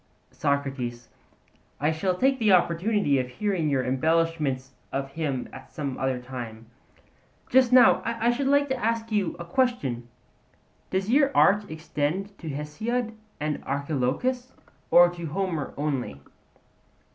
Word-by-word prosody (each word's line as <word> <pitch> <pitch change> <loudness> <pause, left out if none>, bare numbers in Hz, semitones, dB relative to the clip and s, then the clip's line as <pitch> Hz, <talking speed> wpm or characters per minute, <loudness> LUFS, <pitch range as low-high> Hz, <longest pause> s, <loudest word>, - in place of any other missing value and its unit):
SOCRATES: 135 -4 -2 0.7
I 150 +2 +2
shall 180 +4 0
take 265 +3 +2
an 215 - +3
opportunity 175 -3 +3
of 125 - -2
hearing 175 +2 -1
your 135 -2 +1
embellishments 150 -1 0 0.2
of 135 0 -3
him 140 -4 -2
at 130 - -11
some 140 -4 -4
other 130 -1 0
time. 120 -3 -8 0.8
But - - -23
just 255 -1 +5
now 250 -2 +7
I 235 +1 +1
should 265 +3 -1
like 285 +1 +4
to 265 - +1
ask 230 0 -1
you 205 -4 0
a 170 - -7
question: 170 - -1 0.8
Does 190 +3 -1
your 280 +1 +5
art 205 +1 +4
extend 160 +5 -3
to 165 - -6
Hesiod 220 - -3 0.3
and 150 -1 -2
Archilochus, 145 - -1 0.4
or 175 0 +8
to 170 -1 -6
Homer 170 -2 -2
only? 135 - -2
160 Hz, 135 wpm, -26 LUFS, 135-220 Hz, 0.8 s, or